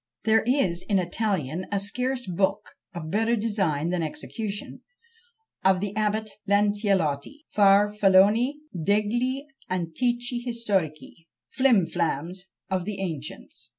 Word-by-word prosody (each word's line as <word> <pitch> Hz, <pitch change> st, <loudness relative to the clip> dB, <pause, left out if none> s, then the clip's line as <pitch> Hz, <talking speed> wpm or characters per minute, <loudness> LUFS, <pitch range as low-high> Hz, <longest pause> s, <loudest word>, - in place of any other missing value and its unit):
There 220 Hz, 0 st, +4 dB
is 195 Hz, -10 st, +2 dB
in 200 Hz, -, +3 dB
Italian 180 Hz, -, -1 dB
a 200 Hz, -, +1 dB
scarce 250 Hz, +5 st, -2 dB
book, 195 Hz, +3 st, -1 dB, 0.2 s
of 170 Hz, -, -5 dB
a -, -, -7 dB
better 225 Hz, +7 st, +1 dB
design 195 Hz, -8 st, 0 dB
than 180 Hz, -1 st, 0 dB
execution, 210 Hz, -, -5 dB, 0.8 s
of 190 Hz, -1 st, +4 dB
the 200 Hz, +1 st, -3 dB
Abbate 215 Hz, 0 st, 0 dB, 0.2 s
Lancellotti, 205 Hz, -, +1 dB
Farfalloni 205 Hz, +3 st, +5 dB, 0.2 s
degli 215 Hz, -, 0 dB, 0.3 s
Antichi 240 Hz, -, -1 dB
Historici. 195 Hz, -9 st, -2 dB, 0.2 s
"Flim 250 Hz, -9 st, +4 dB
flams 170 Hz, +2 st, -2 dB, 0.2 s
of 185 Hz, -2 st, -1 dB
the 205 Hz, -1 st, -4 dB
Ancients." 155 Hz, -9 st, -6 dB
200 Hz, 115 wpm, -26 LUFS, 175-225 Hz, 0.8 s, Farfalloni